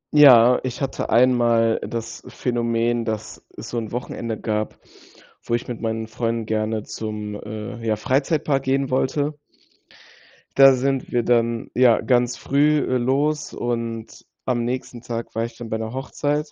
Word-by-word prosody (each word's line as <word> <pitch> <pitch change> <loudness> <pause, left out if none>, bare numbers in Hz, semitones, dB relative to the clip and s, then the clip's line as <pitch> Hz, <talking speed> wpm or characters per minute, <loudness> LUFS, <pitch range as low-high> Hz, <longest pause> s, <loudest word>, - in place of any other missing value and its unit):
Ja, 125 -4 +8
ich 125 -2 -4
hatte 135 -1 -3
einmal 120 -2 +3
das 115 -1 -5
Phänomen, 120 -1 0
dass 110 -1 -5
es 110 - -8
so 120 - -2
'n 110 - -6
Wochenende 115 -2 -4
gab, 105 -1 -2 0.6
wo 120 - -1
ich 120 - -4
mit 120 -2 -6
meinen 110 0 -2
Freunden 115 0 -2
gerne 110 0 -1
zum, 105 -1 -5
äh, 110 +3 -7
ja, 110 -1 +1
Freizeitpark 135 +4 0
gehen 135 0 0
wollte. 145 +3 0 1.2
Da 135 -1 +8
sind 135 +1 -1
wir 120 -1 +1
dann, 115 -1 +1
ja, 125 -2 +5
ganz 125 -1 +1
früh, 150 +2 +2
äh, 130 - +1
los 145 +5 0
und 115 -2 -4 0.2
am 120 -2 0
nächsten 125 -1 -4
Tag 115 -1 -5
war 115 +1 -1
ich 115 -1 -9
dann 120 -2 -8
bei 110 - -1
'ner 110 +2 -5
Hochzeit. 145 +3 -2
120 Hz, 155 wpm, -22 LUFS, 115-130 Hz, 1.2 s, Ja